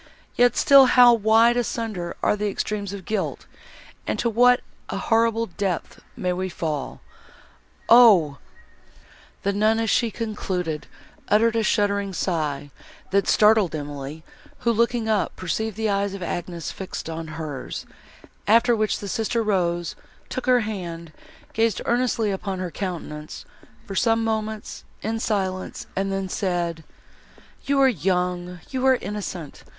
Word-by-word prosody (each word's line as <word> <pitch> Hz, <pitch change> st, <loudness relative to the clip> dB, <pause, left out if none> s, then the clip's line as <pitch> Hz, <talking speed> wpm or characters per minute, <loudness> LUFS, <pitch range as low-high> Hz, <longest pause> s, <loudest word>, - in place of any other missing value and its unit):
Yet 245 Hz, 0 st, +4 dB
still 275 Hz, -1 st, +7 dB
how 245 Hz, -1 st, +7 dB
wide 225 Hz, +2 st, +4 dB
asunder 220 Hz, -7 st, -3 dB
are -, -, +3 dB
the 210 Hz, 0 st, -1 dB
extremes 200 Hz, 0 st, -3 dB
of 200 Hz, -3 st, -8 dB
guilt, 215 Hz, -, -3 dB, 0.6 s
and -, -, -1 dB
to 235 Hz, -, 0 dB
what 245 Hz, +2 st, +5 dB, 0.3 s
a -, -, -3 dB
horrible 230 Hz, 0 st, +2 dB
depth 190 Hz, -2 st, -3 dB, 0.2 s
may 180 Hz, -1 st, -1 dB
we 185 Hz, +1 st, -3 dB
fall! 155 Hz, -5 st, -4 dB, 0.9 s
Oh!—" 200 Hz, -, +6 dB, 1.0 s
The 200 Hz, -, +1 dB
nun, 215 Hz, +2 st, +2 dB
as 225 Hz, -2 st, 0 dB
she 235 Hz, -, +2 dB
concluded, 190 Hz, -8 st, -3 dB, 0.4 s
uttered 225 Hz, +2 st, +3 dB
a 225 Hz, -, +2 dB
shuddering 200 Hz, -2 st, +1 dB
sigh, 150 Hz, -6 st, -2 dB, 0.4 s
that 200 Hz, 0 st, +2 dB
startled 210 Hz, -6 st, +4 dB
Emily, 145 Hz, +1 st, -6 dB, 0.4 s
who, 235 Hz, -, +2 dB
looking 235 Hz, 0 st, +1 dB
up, 215 Hz, -3 st, 0 dB
perceived 210 Hz, +5 st, -3 dB
the 220 Hz, -2 st, 0 dB
eyes 200 Hz, 0 st, -1 dB
of 190 Hz, -, -6 dB
Agnes 175 Hz, -1 st, -4 dB
fixed 190 Hz, -3 st, -6 dB
on 165 Hz, 0 st, -5 dB
hers, 145 Hz, -5 st, -6 dB, 0.6 s
after 230 Hz, +3 st, +5 dB
which 215 Hz, -1 st, 0 dB
the 200 Hz, -, -7 dB
sister 225 Hz, +2 st, -1 dB
rose, 175 Hz, -5 st, 0 dB, 0.3 s
took 255 Hz, -, -5 dB
her 250 Hz, -1 st, +5 dB
hand, 170 Hz, -7 st, -6 dB, 0.4 s
gazed 225 Hz, -2 st, +1 dB
earnestly 235 Hz, -3 st, +1 dB
upon 195 Hz, 0 st, -3 dB
her 180 Hz, -2 st, -4 dB
countenance, 160 Hz, -5 st, -6 dB, 0.4 s
for 195 Hz, -, -7 dB
some 225 Hz, +3 st, +2 dB
moments, 220 Hz, -1 st, -3 dB, 0.2 s
in 225 Hz, +1 st, -2 dB
silence, 190 Hz, -4 st, -2 dB
and 195 Hz, +1 st, -1 dB
then 195 Hz, 0 st, -2 dB
said, 175 Hz, -4 st, -2 dB, 0.8 s
"You 280 Hz, 0 st, +2 dB
are 270 Hz, -, +7 dB
young—you 180 Hz, -, -2 dB
are 260 Hz, -, +6 dB
innocent! 195 Hz, -, -6 dB
200 Hz, 140 wpm, -23 LUFS, 175-225 Hz, 1.0 s, still